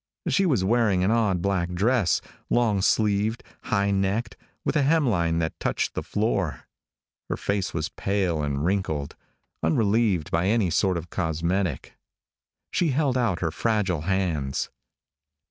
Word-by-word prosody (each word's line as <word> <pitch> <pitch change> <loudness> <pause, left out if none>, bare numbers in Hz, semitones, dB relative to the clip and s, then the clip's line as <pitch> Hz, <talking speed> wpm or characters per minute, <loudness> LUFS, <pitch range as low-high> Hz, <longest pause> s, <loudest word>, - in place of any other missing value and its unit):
She 195 -2 +2
was 125 - +2
wearing 105 -3 +2
an 95 - +2
odd 105 -7 +1
black 90 -3 0
dress, 105 - +2 0.3
long 110 -5 +2
sleeved, 105 +2 +1 0.2
high 100 -1 +1
necked, 100 +4 0 0.3
with - - 0
a 150 - +4
hemline 120 - +2
that 80 -1 -2
touched - - -1
the - - -2
floor. 100 - -1 0.7
Her - - -1
face 100 -1 -1
was 80 -2 -2
pale 95 -5 -1
and 70 0 -1
wrinkled, 85 -7 -1 0.5
unrelieved 100 -1 +1
by 85 +3 +1
any 105 -4 +2
sort 95 +1 +2
of 85 0 -7
cosmetic. 85 -1 -2 0.7
She 175 - +1
held 140 -1 +1
out 115 -8 0
her 80 -2 0
fragile 100 -6 0
hands. 85 -7 -1
95 Hz, 140 wpm, -25 LUFS, 85-110 Hz, 0.7 s, a